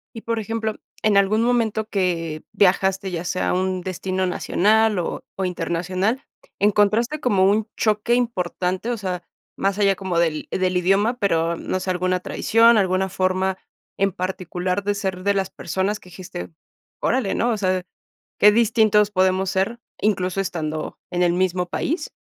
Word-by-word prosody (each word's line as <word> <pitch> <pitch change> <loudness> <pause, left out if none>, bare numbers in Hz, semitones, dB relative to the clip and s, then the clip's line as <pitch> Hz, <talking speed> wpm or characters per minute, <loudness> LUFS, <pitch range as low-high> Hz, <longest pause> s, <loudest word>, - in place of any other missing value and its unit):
Y, 225 - -7
por 230 -1 -2
ejemplo, 220 0 -3 0.3
en 215 -2 +3
algún 200 +3 +3
momento 225 -3 +1
que 170 -6 -1
viajaste, 190 0 +2
ya 170 0 -3
sea 180 +1 -1
a - - +1
un 185 0 0
destino 185 +1 -2
nacional 210 +3 +2
o 170 - -3
o 190 - -2
internacional, 185 +7 -1 0.4
¿encontraste 210 +7 +2
como 195 -5 +3
un 215 +1 +1
choque 215 +2 +1
importante?, 190 -3 -1
o 235 - -2
sea, 180 -3 -4 0.3
más 195 +1 0
allá 195 -1 +4
como 180 -3 -2
del 160 -3 0
del 185 -1 0
idioma, 200 +7 +2
pero 170 -6 +1
no 185 - -3
sé, 185 0 -2
alguna 185 0 0
tradición, 230 +4 +4
alguna 190 -1 +2
forma 185 +1 0 0.4
en 195 0 +2
particular 185 +1 -3
de 205 0 0
ser 190 -2 -3
de 200 0 +2
las 190 -1 -1
personas 200 +3 -2
que 180 - -15
dijiste: 170 - -8 0.5
"Orale", 245 -5 0
¿no?, 240 +1 +1
o 220 - 0
sea, 185 -2 0 0.6
qué 210 0 +7
distintos 215 -2 +3
podemos 185 -1 +2
ser, 215 +5 -1 0.2
incluso 195 -2 0
estando 155 -4 -4
en 180 0 0
el 175 - +3
mismo 180 0 0
país. 310 - -2
190 Hz, 160 wpm, -22 LUFS, 180-215 Hz, 0.6 s, qué